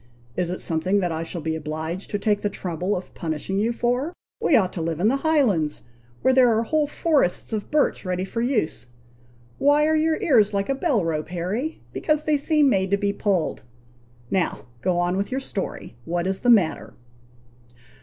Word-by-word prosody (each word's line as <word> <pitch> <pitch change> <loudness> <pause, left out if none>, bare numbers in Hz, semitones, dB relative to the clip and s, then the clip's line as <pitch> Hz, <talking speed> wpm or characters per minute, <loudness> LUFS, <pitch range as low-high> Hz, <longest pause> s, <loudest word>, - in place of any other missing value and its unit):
"Is 180 -2 -1
it 180 - -4
something 175 +5 0
that 180 -3 0
I 160 0 -2
shall 165 +1 -5
be 160 +1 -2
obliged 160 +4 -4
to 205 - -1
take 205 0 +1
the 205 - 0
trouble 180 0 -2
of 180 - -9
punishing 165 +4 -3
you 225 +3 +1
for? 245 +7 -1 0.3
We 295 - +4
ought 190 -6 +3
to 170 - -4
live 165 -1 -2
in 205 +5 +3
the 270 - +2
Highlands, 250 - +1 0.4
where 260 - +4
there 255 -2 +6
are 225 - +1
whole 300 +5 +1
forests 290 - +1
of 210 -2 -3
birch 300 -1 +1
ready 185 -1 -2
for 230 +4 -3
use? 215 - -1 0.7
Why 290 +2 +4
are 315 +1 +3
your 315 0 +2
ears 230 - +3
like 200 +3 -1
a - - +3
bell 270 - +1
rope, 155 -2 -2
Harry? 195 - -3
because 305 -1 0
they 305 -1 +2
seem 300 0 +3
made 190 -7 +2
to 200 - +2
be 200 0 0
pulled. 195 -5 0 0.7
Now, 190 -3 -1 0.2
go 180 -2 +1
on 175 +1 +1
with 200 +1 -1
your 265 - -1
story. 195 - -4
What 175 +1 -1
is 190 0 0
the 245 - +1
matter?" 160 - +3
200 Hz, 195 wpm, -24 LUFS, 175-265 Hz, 0.7 s, there